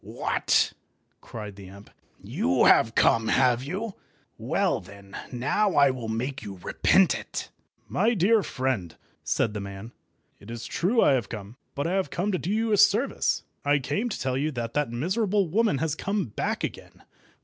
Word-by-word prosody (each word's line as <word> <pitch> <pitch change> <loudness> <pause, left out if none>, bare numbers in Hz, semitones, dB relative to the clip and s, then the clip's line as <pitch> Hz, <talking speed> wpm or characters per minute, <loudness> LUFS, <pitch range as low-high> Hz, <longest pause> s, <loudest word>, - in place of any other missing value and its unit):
"What!" - - +1 0.5
cried 105 -3 -8
the 100 -2 -10
imp. 100 +2 -14 0.3
"You 90 - +1
have 115 0 +5
come, 115 -1 +3
have 125 0 +3
you? 195 +9 -4 0.4
Well 165 - 0
then, 100 0 -13 0.2
now, 145 +12 0
I 140 -1 +5
will 125 -3 -6
make 130 +5 -3
you 100 -3 -8
repent 90 - +3
it." - - -6 0.4
"My 225 +5 +1
dear 210 +4 +4
friend," 130 - -3 0.3
said 105 - 0
the 105 - -4
man, 100 +3 -8 0.5
"it 100 - -14
is 115 0 -6
true 210 - +1
I - - +5
have 130 -5 0
come, 105 0 -8 0.2
but 140 - -2
I 190 +3 +1
came 190 +2 -2
to 185 - -1
do 175 - -4
you 220 +2 0
a 210 - +3
service. 205 +6 +2 0.2
I 145 +1 +3
came 200 - -2
to - - -5
tell 130 -1 -1
you 150 +2 0
that 115 -2 -4
that 150 -4 0
miserable 190 - 0
woman 210 -1 +1
has 155 +1 -1
come 200 +5 -2
back 110 - -3
again." - - -7
135 Hz, 175 wpm, -26 LUFS, -, 0.5 s, have